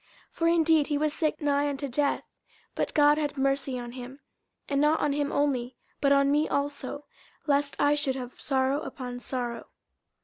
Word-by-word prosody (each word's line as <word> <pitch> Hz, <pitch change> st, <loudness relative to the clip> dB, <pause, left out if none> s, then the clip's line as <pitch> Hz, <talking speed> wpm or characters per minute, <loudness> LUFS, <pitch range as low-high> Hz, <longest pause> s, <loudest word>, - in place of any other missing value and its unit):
50:002:027 -, -, -30 dB
For 330 Hz, -, +3 dB
indeed 325 Hz, -3 st, +4 dB
he 295 Hz, -, 0 dB
was 305 Hz, 0 st, 0 dB
sick 310 Hz, -1 st, -1 dB
nigh 290 Hz, 0 st, +2 dB
unto 280 Hz, 0 st, -3 dB
death: 280 Hz, +2 st, 0 dB, 0.5 s
but -, -, -2 dB
God 295 Hz, 0 st, +5 dB
had 295 Hz, -1 st, -2 dB
mercy 275 Hz, -1 st, 0 dB
on 240 Hz, -1 st, -6 dB
him; 255 Hz, +2 st, -9 dB, 0.5 s
and 280 Hz, 0 st, +1 dB
not 300 Hz, +2 st, +3 dB
on 290 Hz, -, +1 dB
him 290 Hz, 0 st, -1 dB
only, 260 Hz, -4 st, 0 dB, 0.2 s
but 280 Hz, -1 st, +2 dB
on 280 Hz, 0 st, +4 dB
me 300 Hz, +2 st, +2 dB
also, 285 Hz, 0 st, -3 dB, 0.4 s
lest 285 Hz, -1 st, +1 dB
I 290 Hz, +1 st, +3 dB
should 285 Hz, -3 st, 0 dB
have 255 Hz, -2 st, -7 dB
sorrow 270 Hz, +1 st, +1 dB
upon 250 Hz, -4 st, -6 dB
sorrow. 245 Hz, -1 st, -4 dB
285 Hz, 180 wpm, -28 LUFS, 265-295 Hz, 0.5 s, God